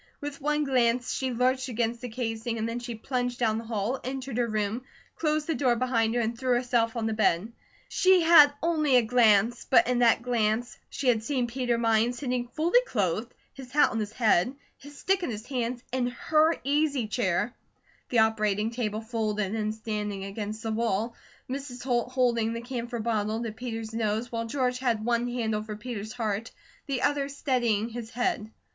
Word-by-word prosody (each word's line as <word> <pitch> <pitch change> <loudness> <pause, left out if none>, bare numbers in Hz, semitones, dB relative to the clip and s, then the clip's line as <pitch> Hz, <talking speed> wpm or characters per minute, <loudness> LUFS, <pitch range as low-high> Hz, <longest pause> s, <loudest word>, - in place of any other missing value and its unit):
With 290 -1 -6
one 300 +1 +1
glance 250 -3 +1
she 260 -1 -1
lurched 255 +2 +1
against 235 -1 -1
the 250 - -5
casing 230 0 -3
and 220 0 -1
then 230 +1 -3
she 240 -1 -6
plunged 245 +1 -2
down 220 -2 +1
the 230 - -8
hall, 225 +3 -2
entered 260 -1 -4
her 240 -1 +1
room, 215 +1 -1 0.3
closed 305 -1 0
the 325 - 0
door 255 -5 +2
behind 230 -2 +1
her, 240 - +2
and 230 +1 -1
threw 250 +1 +1
herself 240 -2 +1
on 230 -2 -1
the 220 - 0
bed. 215 0 +1 0.3
She 370 -2 +4
had 320 -3 +8
only 310 -5 +2
a 245 - +6
glance, 225 -1 +3
but - - +6
in 250 -1 +1
that 235 -1 +4
glance 235 -1 0
she 275 - -4
had 230 -3 +4
seen 255 +1 -1
Peter 245 0 -1
Mines 230 +1 +2
sitting 250 -3 -2
fully 325 - +3
clothed, 210 +2 -1 0.2
his 265 -2 -10
hat 295 +1 +4
on 225 - -2
his 210 0 -4
head, 225 +1 +2 0.2
his 285 +1 -14
stick 385 +4 +1
in 345 - -2
his 215 -1 -5
hands, 245 -2 -3
in 255 -1 0
her 310 +6 +2
easy 285 -3 +1
chair; 210 0 0 0.6
the 245 - 0
operating 215 -1 +2
table 220 -3 -2
folded 215 -3 -2
and 215 -1 -1
standing 210 -3 -4
against 210 +2 -5
the 225 - -2
wall; 225 0 0 0.3
Mrs. 260 -2 -6
Holt 245 -1 0
holding 235 -3 +2
the 230 - -4
camphor 240 -1 -4
bottle 220 0 -1
to 230 - -3
Peter's 225 -1 -6
nose, 225 +1 -1
while 230 -1 -3
George 250 0 -1
had 235 -4 0
one 240 0 +1
hand 240 -3 -1
over 215 0 -3
Peter's 220 -1 -6
heart, 225 -2 -2 0.4
the 270 -3 -2
other 285 -1 +1
steadying 240 -6 0
his 230 -1 -7
head. 220 -2 -1
235 Hz, 190 wpm, -27 LUFS, 220-255 Hz, 0.6 s, had